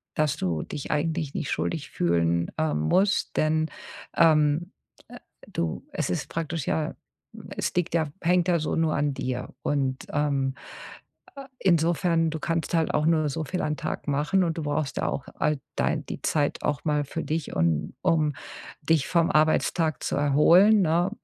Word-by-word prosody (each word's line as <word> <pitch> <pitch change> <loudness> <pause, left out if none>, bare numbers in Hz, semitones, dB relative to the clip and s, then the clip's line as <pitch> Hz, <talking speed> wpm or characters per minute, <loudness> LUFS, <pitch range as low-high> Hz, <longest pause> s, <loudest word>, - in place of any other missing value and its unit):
dass 155 -2 +1
du 85 -4 -1
dich 145 - -6
eigentlich 155 0 -1
nicht 145 - -3
schuldig 160 -4 -2
fühlen, 85 0 +1
ähm, 155 - 0
musst, 190 - +1
denn, 155 +1 +2 0.5
ähm, 155 +2 +4 0.4
äh - - -10 0.4
du 80 -2 -2
es - - -2
ist - - -2
praktisch 165 -3 -3
ja 155 -1 -1 0.6
es - - -1
liegt 180 -1 0
ja 160 -2 +2
hängt 180 +1 +2
ja 170 -1 +3
so 155 - -2
nur 160 -1 +1
an 145 0 0
dir 125 -1 -4
und, 135 -2 -1
ähm, 140 -2 0 0.8
äh, 275 - -7
insofern 170 -1 +2
du 160 - -4
kannst 165 +1 -2
halt 165 -1 +1
auch 150 - +1
nur 155 -2 +2
so 155 +3 -3
viel 180 +5 -3
am 150 0 -1
Tag - - -4
machen 150 +7 +2
und 165 -2 -1
du 160 - -3
brauchst 145 -1 -2
ja - - 0
auch 140 - -3
all 150 0 +1 0.2
dei - - +1
die - - -7
Zeit 145 -2 0
auch 145 -2 -1
mal 150 -1 +1
für 165 +4 -4
dich, 160 -1 -3
un 80 - 0
um 160 -4 +2 0.5
dich 155 -1 +2
vom 170 -2 +2
Arbeitstag 155 0 +2
zu - - -1
erholen, 170 +9 +5
ne? 175 +1 +2
155 Hz, 170 wpm, -26 LUFS, 145-165 Hz, 0.8 s, erholen